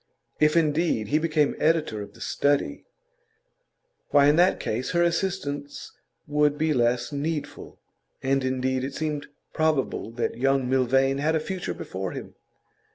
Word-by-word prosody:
If 150 +2 +4
indeed 150 -8 +1
he 150 - +3
became 155 -2 +1
editor 155 -9 +1
of 100 - -10
The - - -15
Study, 145 - 0 1.2
why, 145 -1 +5
in 145 +1 +5
that 180 +2 +4
case 125 +9 -3
her 170 0 +3
assistance 170 -5 -2 0.3
would 150 0 +2
be 155 0 +1
less 120 +1 +1
needful. 150 +1 -4 0.4
And 135 0 +1
indeed 130 0 -1
it 135 +1 -4
seemed 150 -2 -3 0.3
probable 155 -8 0
that 120 0 -2
young 135 0 +2
Milvain 135 +1 +2
had 155 +3 +1
a - - +2
future 185 +3 -4
before - - -5
him. - - -8
145 Hz, 145 wpm, -25 LUFS, 130-160 Hz, 1.2 s, why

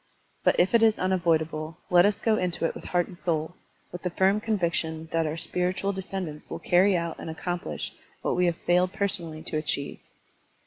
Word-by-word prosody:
But - - +3
if 180 +5 +3
it 230 - +6
is 220 -1 +5
unavoidable, 165 -4 0
let 175 +2 +7
us 205 - 0
go 225 -1 +2
into 180 -4 0
it - - 0
with - - -10
heart 175 -1 +1
and 185 - -12
soul, 160 -2 -1 0.4
with 175 - -7
the 180 - -1
firm 190 +4 +2
conviction 165 -6 -1
that 165 -1 +1
our 155 +2 -3
spiritual 180 +3 0
descendants 190 -5 -5
will - - -4
carry 185 +2 +4
out 170 -1 -3
and - - -6
accomplish 175 +2 -4 0.3
what - - +1
we 180 0 +3
have 170 -1 0
failed 180 +1 +3
personally 170 -6 -2
to 160 - -2
achieve. 150 -2 -2
175 Hz, 190 wpm, -27 LUFS, 160-190 Hz, 0.4 s, let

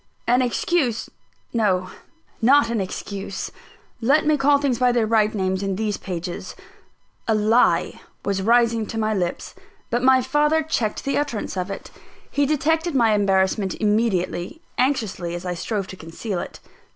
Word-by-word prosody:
An 245 +2 +3
excuse 250 0 0 0.4
no! 190 -5 +1 0.5
not 260 +1 +5
an 225 -3 0
excuse; 195 +1 -5 0.5
let 285 +7 +3
me 305 0 +4
call 285 0 +4
things 275 -4 0
by 250 -1 +4
their 240 -2 +2
right 215 -1 +3
names 190 -1 0
in 195 -1 -1
these 210 0 -1
pages 180 0 -6 0.7
a 220 - +3
lie 215 +3 +2 0.2
was 195 -1 0
rising 230 0 +3
to 225 - -5
my 215 0 +1
lips; 180 -4 -3 0.4
but 240 +1 +1
my 260 0 +5
father 295 +5 +2
checked 240 -9 -1
the 275 - 0
utterance 240 -10 -3
of 185 +1 -2
it. 195 - -7 0.4
He 285 -1 +1
detected 320 +2 +1
my 230 -4 +4
embarrassment 195 -1 +1
immediately, 210 - 0 0.2
anxiously 220 -10 -1
as 175 +1 -6
I 180 - -1
strove 195 +3 -3
to - - -7
conceal 175 +4 -5
it. - - -7
220 Hz, 155 wpm, -22 LUFS, 195-260 Hz, 0.7 s, not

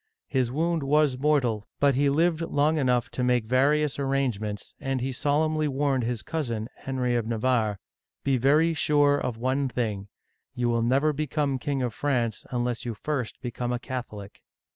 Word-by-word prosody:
His 125 -2 +1
wound 165 +3 0
was 145 -1 +3
mortal, 130 -8 +1
but 140 -1 +4
he 140 +2 +2
lived 165 +3 +2
long 155 -1 +1
enough 125 -3 +1
to 125 - -2
make 125 -2 +2
various 140 +4 +2
arrangements, 125 -7 -2
and 135 -1 -2
he 130 +2 -2
solemnly 155 +3 +1
warned 135 -3 0
his 115 -3 -2
cousin, 120 -8 -3
Henry 125 -2 -2
of 115 -2 -1
Navarre, 115 -2 +1 0.2
" - - -64
Be 135 -2 +2
very 150 +6 +3
sure 145 -2 +3
of 125 -4 -3
one 130 +3 0
thing, 110 -5 -2 0.5
you 120 -1 0
will 115 0 +1
never 135 +6 +2
become 145 -2 -1
King 140 -2 -1
of 120 -3 -2
France 120 -6 -1
un 120 -1 -1
less 120 -1 -2
you 120 -2 -4
first 125 0 -3
become 120 0 -3
a 125 - 0
Catholic 120 -5 -7
130 Hz, 175 wpm, -26 LUFS, 120-145 Hz, 0.5 s, but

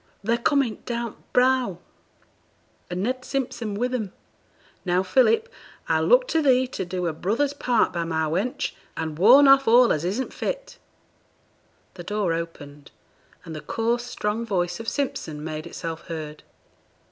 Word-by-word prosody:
They're 230 +3 +1
coming 260 -3 +1
down 235 -2 -3
th' - - -29
brow, 250 -7 +2 1.1
and 180 +2 -3
Ned 255 +3 -2
Simpson 240 -6 -3
wi' 240 +4 0
them. 235 -7 -3 0.7
Now, 180 0 +1
Philip, 355 - +3 0.4
I - - +2
look - - +4
to 325 - +2
thee 260 -3 +4
to 195 - -4
do 180 0 -3
a 165 - -1
brother's 230 - 0
part 245 -5 +1
by 170 -1 -1
my 160 -1 -1
wench, 190 +11 -1 0.3
and 160 -1 -4
warn 255 +9 +8
off 275 -1 +6
all 240 +1 +6
as 155 - -2
isn't 205 +9 -2
fit.' - - -4 1.1
The 175 - -9
door 205 -2 -1
opened, 150 -4 -7 0.6
and 160 - -7
the 155 - -6
coarse 235 +8 -1
strong 225 -2 -2
voice 180 -5 -1
of 225 - -3
Simpson 160 - -3
made 155 +1 -5
itself 165 -1 -6
heard. 155 -2 -6
215 Hz, 155 wpm, -24 LUFS, 170-255 Hz, 1.1 s, warn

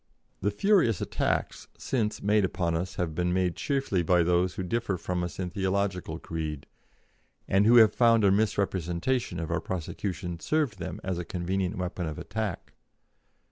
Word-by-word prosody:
The 100 - +2
furious 120 - +3
attacks - - -1
since 110 -5 -2
made 105 +1 +3
upon 85 -2 0
us 90 +3 -2
have 85 -3 -2
been 90 +2 0
made 90 -1 +1
chiefly 135 -10 0
by 85 +1 +3
those 90 +1 +2
who 95 - -3
differ 100 0 -1
from 90 +1 -2
us 90 - -5
in 90 -2 -3
theological 95 -3 -1
creed, 80 -4 -5 0.8
and 100 +2 +3
who 120 - +7
have 110 -2 +7
found 115 -2 +4
a 100 - +5
misrepresentation 100 0 0
of 80 - -4
our - - 0
prosecution 90 0 -4
served 145 - 0
them 85 - -5
as 95 -2 -2
a - - -3
convenient 90 +3 -2
weapon 90 -1 -3
of 80 - -5
attack. 110 -5 -4
95 Hz, 165 wpm, -28 LUFS, 85-105 Hz, 0.8 s, who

